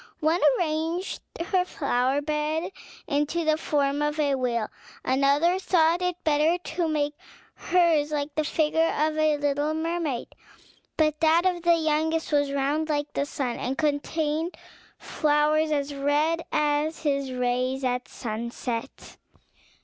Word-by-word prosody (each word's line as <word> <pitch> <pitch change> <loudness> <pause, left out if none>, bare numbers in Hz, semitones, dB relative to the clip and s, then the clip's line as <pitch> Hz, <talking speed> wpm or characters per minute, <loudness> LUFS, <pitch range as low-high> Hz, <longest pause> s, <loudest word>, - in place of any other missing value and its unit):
One 320 +3 +1 0.2
arranged 325 +2 -2 0.2
her 360 +2 +1
flower 275 -4 0
bed 305 +3 -1 0.3
into 295 +3 0
the 310 0 +3
form 290 -2 0
of 295 +1 -1
a 285 -2 +2
whale; 240 -4 0 0.4
another 280 +7 +3
thought 340 -2 +2
it 360 -1 0
better 310 +3 +3
to 345 -1 -3
make 295 -2 0 0.4
hers 335 -5 +2
like 290 0 -2
the 310 - 0
figure 320 +2 +1
of 310 +1 +1
a 310 -1 +2
little 290 +1 0
mermaid; 320 -5 -2 0.6
but 305 -1 +2
that 325 +2 +4
of 360 -2 +1
the 340 0 +4
youngest 320 0 0
was 285 -1 +2
round 285 +3 0
like 290 -1 -1
the 280 - -1
sun, 255 -5 -3
and 265 +2 -3
contained 310 +2 -1 0.4
flowers 305 +1 +1
as 285 -1 -1
red 295 +4 +1
as 300 +1 0
his 280 -3 0
rays 255 +1 -1
at 250 0 -1
sunset. 235 +2 -5
300 Hz, 135 wpm, -26 LUFS, 280-320 Hz, 0.6 s, that